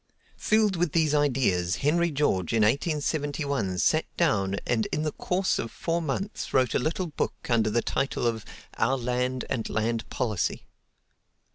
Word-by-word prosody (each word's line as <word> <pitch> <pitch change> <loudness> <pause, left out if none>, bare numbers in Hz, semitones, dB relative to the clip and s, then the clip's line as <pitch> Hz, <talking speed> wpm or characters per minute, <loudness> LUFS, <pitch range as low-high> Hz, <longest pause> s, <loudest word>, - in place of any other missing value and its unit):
Filled 215 -3 +2
with 170 -3 0
these 155 -3 +2
ideas, 120 -12 +2
Henry 170 +3 +3
George 135 - 0
in 115 -1 +3
1871 140 - 0
sat 155 - +2
down 100 - +2
and 115 -2 +1
in 150 - -1
the 155 - -1
course 185 +5 0
of 115 - -3
four 170 +6 -2
months 170 +7 -3
wrote 130 -3 +3
a - - +2
little 160 +7 -1
book 155 - -2
under 115 -3 +2
title 135 0 -1
of 115 -2 0 0.4
"Our 130 +4 +2
Land 125 +1 -1
and 115 - -2
Land 115 +1 -1
Policy." 110 -8 -2
135 Hz, 150 wpm, -27 LUFS, 115-155 Hz, 0.4 s, Henry